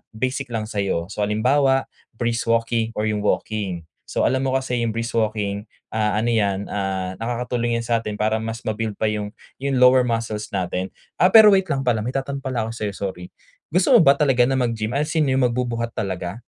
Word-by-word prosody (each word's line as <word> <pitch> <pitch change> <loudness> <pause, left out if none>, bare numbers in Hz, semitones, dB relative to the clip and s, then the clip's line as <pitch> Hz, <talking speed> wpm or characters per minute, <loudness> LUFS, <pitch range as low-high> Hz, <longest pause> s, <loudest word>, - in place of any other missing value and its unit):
basic 130 +4 -2
lang 110 -1 -1
sa'yo. 100 -5 -2
So, 105 0 -1
halimbawa 135 +6 +2 0.3
brisk 115 0 -2
walking 115 0 0
or 105 - -1
yung 105 -1 0
walking. 100 -4 -2 0.2
So, - - -1
alam 130 - +2
mo 130 - 0
kasi 130 -2 -1
yung 115 -2 -1
brisk 115 0 -1
walking, 105 -1 -2 0.2
ah, 105 -1 0
ano 115 +3 +1
yan, 100 -3 +1
ah, 95 -2 -2
nakakatulong 120 0 -1
yan 115 - -2
sa'tin 115 -2 -1
para 110 +1 0
mas 115 +1 -5
mabuild 110 -1 -3
pa 110 +1 0
yung 105 0 -4 0.2
yung 135 0 -1
lower 125 0 +5
muscles 115 -2 -2
natin. 90 0 -2 0.3
Ah, 180 - +6
pero 220 -2 +10
wait 190 -1 +3
lang 140 -4 -1
pala, 120 -4 +1
may 120 +5 -4
itatanong 140 +1 -2
pala 130 -4 -2
ako 110 - -4
sa'yo, 105 -3 -4
sorry. 95 -3 -5 0.4
Gusto 180 +4 +2
mo - - +5
ba 140 -5 +6
talaga 130 -5 +3
na 135 - +1
mag-gym 115 -2 -1
as 150 +2 0
in 150 - +2
yung 130 0 +2
magbubuhat 120 -1 -1
talaga? 95 -2 -4
115 Hz, 200 wpm, -22 LUFS, 105-125 Hz, 0.4 s, pero